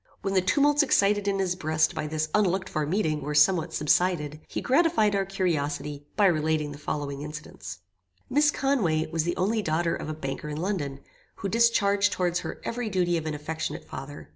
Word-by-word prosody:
When 195 Hz, -, -1 dB
the 190 Hz, -, +4 dB
tumults 290 Hz, -, +3 dB
excited 205 Hz, -7 st, +2 dB
in 200 Hz, -1 st, +1 dB
his 185 Hz, -2 st, 0 dB
breast 155 Hz, -2 st, +1 dB
by 150 Hz, -, -3 dB
this 155 Hz, 0 st, -2 dB
unlooked 190 Hz, -2 st, +1 dB
for 155 Hz, -2 st, -2 dB
meeting 155 Hz, -4 st, 0 dB
were 150 Hz, +2 st, -3 dB
somewhat 160 Hz, +2 st, +4 dB
subsided, 150 Hz, -1 st, +1 dB
he -, -, -4 dB
gratified 265 Hz, -8 st, +3 dB
our 195 Hz, -1 st, +1 dB
curiosity 150 Hz, -6 st, -2 dB
by 205 Hz, -, +4 dB
relating 155 Hz, -3 st, +1 dB
the 145 Hz, -, -9 dB
following 145 Hz, -2 st, -4 dB
incidents. 150 Hz, -, -8 dB, 0.5 s
"Miss 295 Hz, +2 st, +3 dB
Conway 210 Hz, -, +1 dB
was 165 Hz, -1 st, 0 dB
the 175 Hz, -, -1 dB
only 215 Hz, +4 st, +1 dB
daughter 165 Hz, -1 st, 0 dB
of -, -, -6 dB
a 155 Hz, -, -3 dB
banker 135 Hz, 0 st, -5 dB
in 150 Hz, -, -4 dB
London, 155 Hz, -7 st, -3 dB, 0.3 s
who 195 Hz, -, -4 dB
discharged 205 Hz, -3 st, +3 dB
towards 175 Hz, -1 st, 0 dB
her -, -, -6 dB
every 235 Hz, -1 st, -3 dB
duty 180 Hz, -3 st, +1 dB
of 160 Hz, -1 st, -2 dB
an 155 Hz, -, -2 dB
affectionate 155 Hz, +1 st, -4 dB
father. 140 Hz, +2 st, -8 dB
170 Hz, 190 wpm, -27 LUFS, 150-200 Hz, 0.5 s, the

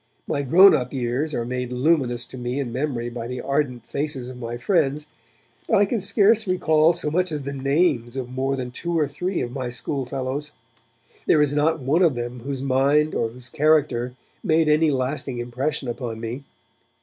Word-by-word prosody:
My 140 Hz, -, -1 dB
grown 180 Hz, +9 st, +7 dB
up 125 Hz, -2 st, -3 dB
years 130 Hz, +4 st, -1 dB
are 115 Hz, -, -2 dB
made 125 Hz, 0 st, -3 dB
luminous 125 Hz, -3 st, +1 dB
to 130 Hz, -, -11 dB
me 125 Hz, +3 st, -3 dB
in 130 Hz, -4 st, -3 dB
memory 125 Hz, -2 st, -2 dB
by 120 Hz, -1 st, -5 dB
the 125 Hz, 0 st, -5 dB
ardent 140 Hz, -2 st, -1 dB
faces 140 Hz, -4 st, -3 dB
of 130 Hz, -, -9 dB
my 120 Hz, 0 st, -5 dB
friends, 150 Hz, -2 st, +1 dB, 0.6 s
but 220 Hz, -, +3 dB
I 205 Hz, -, +5 dB
can 225 Hz, +3 st, -1 dB
scarce 205 Hz, +2 st, +3 dB
recall 160 Hz, -3 st, +3 dB
so 160 Hz, -3 st, -1 dB
much 180 Hz, +2 st, +1 dB
as 150 Hz, -2 st, -3 dB
the 140 Hz, +1 st, -4 dB
names 135 Hz, -3 st, +1 dB
of 130 Hz, -2 st, -3 dB
more 130 Hz, +2 st, -1 dB
than 125 Hz, -2 st, -5 dB
two 170 Hz, +6 st, -3 dB
or 150 Hz, -2 st, +2 dB
three 180 Hz, +6 st, -3 dB
of 120 Hz, -, -3 dB
my 130 Hz, -1 st, -4 dB
schoolfellows. 135 Hz, +3 st, -4 dB, 0.7 s
There -, -, +5 dB
is 145 Hz, -1 st, +3 dB
not 150 Hz, +1 st, +1 dB
one 145 Hz, +7 st, +2 dB
of 165 Hz, -7 st, +4 dB
them 120 Hz, +1 st, -5 dB
whose 135 Hz, +2 st, -4 dB
mind 140 Hz, +3 st, +2 dB
or 115 Hz, -, 0 dB
whose 125 Hz, +2 st, -9 dB
character 140 Hz, -5 st, +1 dB, 0.3 s
made 160 Hz, 0 st, +3 dB
any 155 Hz, +1 st, +4 dB
lasting 130 Hz, -1 st, -2 dB
impression 130 Hz, +4 st, -3 dB
upon 120 Hz, -2 st, -4 dB
me. 120 Hz, +5 st, -6 dB
135 Hz, 190 wpm, -23 LUFS, 125-155 Hz, 0.7 s, grown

